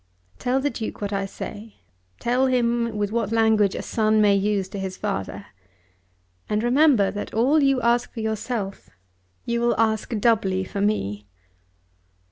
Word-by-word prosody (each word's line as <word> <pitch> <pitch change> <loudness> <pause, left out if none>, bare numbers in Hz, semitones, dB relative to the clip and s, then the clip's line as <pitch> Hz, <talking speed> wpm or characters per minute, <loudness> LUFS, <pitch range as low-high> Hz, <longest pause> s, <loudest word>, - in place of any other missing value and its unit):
Tell 255 +2 +1
the 285 +1 -1
Duke 220 - -5
what 205 0 -3
I 195 0 -1
say; 210 +2 -8 0.4
tell 250 +2 +1
him 235 -3 0
with 205 -1 -1
what 225 -2 -1
language 220 -3 +3
a - - -4
son 215 -1 +1
may 205 -1 +5
use 200 -1 0
to 200 - -6
his 190 -1 -5
father. 95 +1 -4 1.0
And 210 +1 0
remember 250 -4 +4
that 205 +1 -6
all 270 +7 +3
you 275 -2 +3
ask 235 +1 +2
for 230 - -6
yourself 220 -2 -4 0.6
you 235 0 -1
will 235 -1 +1
ask 220 -1 +1
doubly 200 -4 +2
for 195 +1 -5
me." 105 - -1
220 Hz, 155 wpm, -23 LUFS, 200-235 Hz, 1.0 s, may